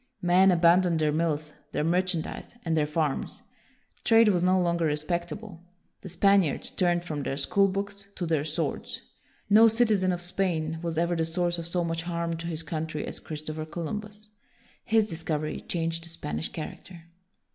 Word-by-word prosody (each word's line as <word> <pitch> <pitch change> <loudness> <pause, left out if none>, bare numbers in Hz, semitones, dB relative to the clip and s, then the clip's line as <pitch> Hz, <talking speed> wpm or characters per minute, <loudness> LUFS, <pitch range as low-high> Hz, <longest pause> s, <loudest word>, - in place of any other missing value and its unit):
Men 180 +2 +5
abandoned 175 0 +4
their 155 -1 +2
mills, 155 -1 -1 0.2
their - - 0
merchan 175 0 +1
dise, - - -8
and 165 -1 +1
their 150 -2 +2
farms. 150 -2 -2 0.6
Trade 225 -1 +6
was 180 -3 +2
no 185 +1 +4
longer 170 -1 +1
respectable. 170 +5 -3 0.4
The 190 - -8
Spaniards 195 -3 +2
turned 175 -1 +1
from 150 -4 -3
their 135 0 -3
school 200 +6 +3
books 200 +1 -4
to 175 - -3
their 160 -3 +1
swords. 155 0 -3 0.4
No 220 +3 +7
citizen 215 -5 +3
of 175 - -2
Spain 165 -3 -1
was 165 -2 -3
ever 170 +1 +1
the 165 - +1
source 175 +1 -1
of 165 - -5
so 175 0 0
much 165 0 -2
harm 170 0 -2
to 165 +1 -6
his 165 -1 -4
country 155 -1 -3
as - - -6
Christopher 155 0 -6
Columbus. 210 +6 -6 0.6
His 220 -2 +3
discovery 160 -4 -3
changed 165 -1 -2
the 170 - -8
Spanish 80 - -4
character. 165 - -8
170 Hz, 170 wpm, -27 LUFS, 160-185 Hz, 0.6 s, No